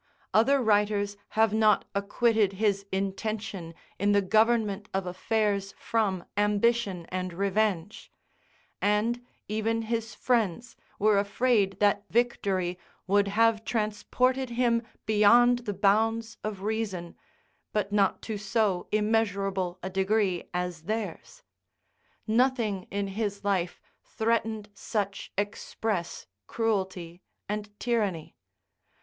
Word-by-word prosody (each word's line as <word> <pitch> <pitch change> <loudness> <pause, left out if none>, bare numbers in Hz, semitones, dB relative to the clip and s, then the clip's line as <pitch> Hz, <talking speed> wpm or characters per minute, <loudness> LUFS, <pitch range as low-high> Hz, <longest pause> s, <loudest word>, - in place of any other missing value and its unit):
Other 270 +6 +4
writers 205 -1 +2 0.2
have 220 -1 +4
not 215 -2 +4
acquitted 205 0 +2
his 200 -1 0
intention 195 -2 -3 0.2
in 205 +2 +3
the 200 - +4
government 215 0 +2
of 195 -1 0
affairs 200 +2 -1
from 200 -6 -1
ambition 205 -2 +1
and 185 0 -3
revenge; 200 0 -1 0.7
and 220 +4 +1 0.2
even 225 +2 -1
his 225 0 -3
friends 230 -1 0 0.2
were 210 -1 +4
afraid 200 -2 +1
that 205 0 +3
victory 195 -7 0 0.3
would 200 +1 +3
have 225 +2 +3
transported 245 +4 0
him 235 -1 +2 0.2
beyond 235 +3 +5
the 205 - 0
bounds 225 +3 +2
of 205 -3 -4
reason, 205 -5 -3 0.6
but 205 -1 -1
not 200 -2 +2
to 215 -2 -4
so 205 -3 0
immeasurable 200 -4 0
a 190 - -3
degree 190 -1 0
as 180 -2 -3
theirs; 215 +1 -4 0.8
nothing 225 -4 +1
in 200 0 -2
his 205 0 -3
life 190 -4 0 0.2
threatened 220 -1 -1
such 200 0 -3
express 205 -2 -3 0.2
cruelty 190 -6 -2 0.3
and 205 0 -5
tyranny. 205 -9 -1
210 Hz, 105 wpm, -28 LUFS, 195-225 Hz, 0.8 s, beyond